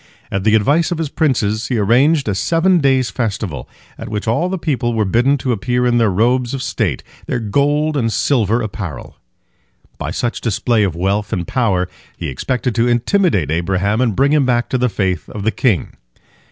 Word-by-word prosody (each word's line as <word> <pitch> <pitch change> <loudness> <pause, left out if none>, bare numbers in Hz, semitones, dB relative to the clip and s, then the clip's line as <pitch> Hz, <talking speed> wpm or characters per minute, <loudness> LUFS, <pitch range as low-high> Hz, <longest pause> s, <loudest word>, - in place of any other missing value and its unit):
At 95 -1 -1
the 110 +1 +4
advice 145 - +2
of 175 - -1
his 160 -3 -2
princes, 115 -8 0
he 120 - -1
arranged 130 +8 +3
a 105 - +1
seven 170 - +2
days' 135 -4 +2
festival, 105 - -3 0.3
at - - -7
which 105 +1 -4
all 160 +11 +1
the 190 - -2
people 125 -8 -1
were 110 -1 +1
bidden 120 +8 +2
to 130 -1 -2
appear 120 +3 0
in 120 -1 +2
their 115 -2 +3
robes 120 +6 +1
of 135 - -4
state, 105 - -2 0.2
their 130 - -1
gold 145 +7 +1
and 115 -5 0
silver 115 -2 +1
apparel. 95 - -6 0.8
By - - -3
such 120 - -2
display 115 +1 +1
of 95 -5 0
wealth 100 +4 -1
and 90 -2 -2
power 110 -8 0 0.3
he - - -4
expected 125 - -2
to 120 +1 +1
intimidate 120 - +1
Abraham 95 +6 0
and 115 -6 +1
bring 140 +3 +3
him 150 -2 +4
back 120 -2 0
to 130 - 0
the 125 0 +2
faith 95 -6 -2
of 105 - -6
the 110 - +1
king. 110 - 0
120 Hz, 195 wpm, -17 LUFS, 100-135 Hz, 0.8 s, the